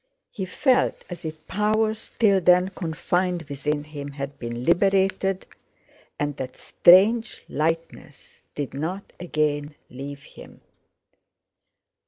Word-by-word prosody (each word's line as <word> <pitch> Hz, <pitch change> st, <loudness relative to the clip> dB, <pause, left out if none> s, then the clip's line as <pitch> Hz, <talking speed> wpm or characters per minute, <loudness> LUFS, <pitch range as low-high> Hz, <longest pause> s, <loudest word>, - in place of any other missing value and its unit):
He 190 Hz, -, -4 dB
felt 255 Hz, +6 st, +2 dB
as 175 Hz, -, -7 dB
if 155 Hz, 0 st, -7 dB
powers 215 Hz, +1 st, 0 dB
till 200 Hz, -4 st, +4 dB
then 180 Hz, +1 st, +5 dB
confined 175 Hz, 0 st, -1 dB
within 145 Hz, 0 st, -2 dB
him 145 Hz, -2 st, -7 dB
had 140 Hz, 0 st, -6 dB
been 120 Hz, 0 st, -5 dB
liberated, 195 Hz, +1 st, +2 dB, 0.7 s
and 145 Hz, -1 st, -2 dB
that 130 Hz, -2 st, -6 dB
strange 215 Hz, +6 st, +4 dB
lightness 165 Hz, +2 st, -4 dB, 0.2 s
did 145 Hz, -2 st, -4 dB
not 170 Hz, +8 st, -4 dB
again 150 Hz, -3 st, -1 dB, 0.2 s
leave 140 Hz, +2 st, -8 dB
him. -, -, -14 dB
165 Hz, 110 wpm, -24 LUFS, 145-195 Hz, 0.7 s, then